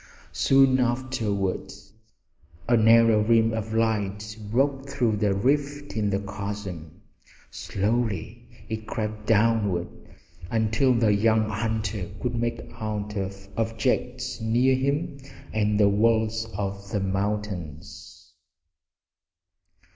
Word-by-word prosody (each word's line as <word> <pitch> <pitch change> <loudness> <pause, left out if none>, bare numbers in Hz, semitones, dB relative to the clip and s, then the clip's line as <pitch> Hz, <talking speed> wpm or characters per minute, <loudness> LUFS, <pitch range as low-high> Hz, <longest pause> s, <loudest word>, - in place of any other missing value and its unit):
Soon 130 +8 +4
afterward 120 -7 -1 1.0
a 120 - +4
narrow 115 -1 +6
rim 115 +1 +3
of 110 -1 -3
light 105 -1 -1
broke 135 +3 0
through 120 -6 +1
the 105 -1 +1
rift 145 +7 0
in 105 -2 0
the 100 - +1
chasm. 100 -5 -6 0.5
Slowly 105 -2 -2 0.2
it 110 -1 -5
crept 110 -1 -4
downward, 105 -5 +2 0.6
until 115 +4 +2
the 110 -3 +3
young 110 +1 +3
hunter 110 -2 -2
could 125 +1 -2
make 120 0 -2 0.2
out 105 -1 -3 0.4
objects 125 +2 -1
near 120 +4 +3
him 140 +3 -1 0.3
and 105 -1 +1
the 105 - +6
walls 110 +2 +2
of 100 0 -4
the 105 - -1
mountains. 95 -5 -4
110 Hz, 100 wpm, -25 LUFS, 105-120 Hz, 1.0 s, narrow